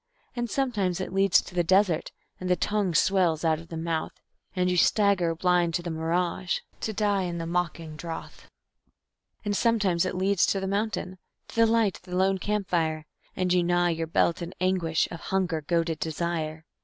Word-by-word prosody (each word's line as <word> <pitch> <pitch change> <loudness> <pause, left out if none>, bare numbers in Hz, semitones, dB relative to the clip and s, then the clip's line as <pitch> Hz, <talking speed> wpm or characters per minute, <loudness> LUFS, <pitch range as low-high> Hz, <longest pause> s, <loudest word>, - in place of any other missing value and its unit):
And 240 -1 -2
sometimes 210 -9 0
it 185 - -4
leads 195 -4 +4
to - - -12
the 175 -1 +2
desert, 185 -1 +2 0.3
and 185 - -4
the 180 - +4
tongue 200 -1 0
swells 175 -2 +2
out 160 -1 +2
of 165 - -12
the 165 - -6
mouth, 165 -1 -3 0.4
And 180 -1 +1
you 180 - +1
stagger 185 -3 +3
blind 175 -1 +2
to 175 - -1
the 170 - -4
mirage, 170 +2 -1 0.2
to 220 - -2
die 205 -2 +1
in 175 -2 -3
the 165 - -4
mocking 165 -2 -2
drouth. 165 0 -8 1.0
And 205 0 0
sometimes 200 -7 +2
it 185 - -2
leads 190 0 +2
to 195 - +1
the 190 - -3
mountain, 195 -2 -2 0.3
to - - -12
the 230 0 +5
light 225 -4 +2
of - - -23
the 180 -1 -4
lone 190 +1 +2
camp 210 0 -2
fire, 160 -3 0 0.3
And 180 -1 +1
you 180 -1 +3
gnaw 175 0 +2
your 165 -1 -2
belt 165 +2 +1
in 170 - -4
the 185 - -7
anguish 175 -4 +1
of 170 - -6
hunger 180 -4 -1
goaded 165 0 0
desire. 160 -1 -3
180 Hz, 195 wpm, -27 LUFS, 165-195 Hz, 1.0 s, the